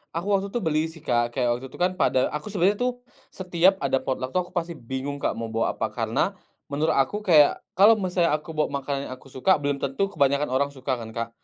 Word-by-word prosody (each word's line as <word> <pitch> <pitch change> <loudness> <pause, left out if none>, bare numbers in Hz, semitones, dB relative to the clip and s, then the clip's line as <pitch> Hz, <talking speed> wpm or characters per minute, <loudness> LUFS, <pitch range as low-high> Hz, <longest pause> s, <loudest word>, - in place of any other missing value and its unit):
Aku 185 +5 -2
waktu 195 0 +2
itu 220 +4 -3
beli, 155 -2 +1
sih, 160 -1 -13
Kak, 120 -3 0
kayak 120 -2 +1
waktu 130 - -8
itu, - - -14
kan, 180 +1 +2
pada 130 - +2
aku 150 0 -5
sebenernya, 200 0 +1
tuh, 250 0 +1 0.4
setiap 180 0 +2
ada 135 -1 +2
potluck 130 -1 -3
waktu 185 - +1
aku - - -19
pasti 170 -1 -2
bingung 130 +3 -5
Kak - - -1
mau 115 -1 -5
bawa 115 0 0
apa. - - -2
Karena, - - 0 0.4
menurut 150 +3 +1
aku 135 +10 +1
kayak, 160 -8 +5 0.2
kalau 215 +3 +6
misalnya 180 -3 +1
aku 155 +2 -3
bawa 155 -1 0
makanan 140 0 -3
yang - - -3
aku 130 - -18
suka, 135 +7 +2
belum 145 -1 -2
tentu 140 +9 0
kebanyakan 140 -5 +1
orang 135 +2 +1
suka, 135 -1 -3
kan, 115 -2 -8
Kak. 115 0 -4
145 Hz, 230 wpm, -25 LUFS, 130-180 Hz, 0.4 s, kalau